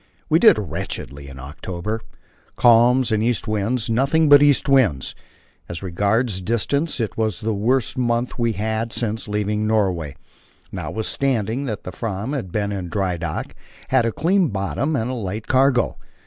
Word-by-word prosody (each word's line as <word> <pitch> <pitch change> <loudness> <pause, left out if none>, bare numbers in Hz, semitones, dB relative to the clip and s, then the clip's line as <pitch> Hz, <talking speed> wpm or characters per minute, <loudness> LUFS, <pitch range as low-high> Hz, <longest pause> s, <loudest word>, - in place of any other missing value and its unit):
We 160 - +4
did 220 - +7
wretchedly 80 -6 -5
in 70 -1 -10
October 85 +10 -5 0.5
calms 120 +1 +5
and 110 -1 +2
east 115 0 0
winds, 110 +3 -1
nothing 140 +7 +2
but 145 0 +8
east 145 -2 +4
winds; 115 - +2 0.6
as 85 +2 -6
regards 100 +3 0
distance 130 - -1
it 110 -3 -3
was 110 -4 -1
the 110 0 -1
worst 120 +5 0
month 120 0 -1
we 115 -1 +1
had 110 +2 -2
had 115 0 -4
since 110 -2 -3
leaving 105 +1 -1
Norway, 95 -9 0 0.6
notwithstanding 115 +2 -2
that 110 -6 -4
the 90 - -6
Fram 110 +5 -4
had 120 -11 -4
been 105 +1 -1
in 95 -4 -4
dry 95 -1 -1
dock, 85 - -4 0.4
had 130 -3 +3
a - - 0
clean 180 - +2
bottom 100 - -2
and 120 -1 -1
a - - -3
light 110 -2 -4
cargo. 130 -1 +2
110 Hz, 160 wpm, -21 LUFS, 100-125 Hz, 0.6 s, but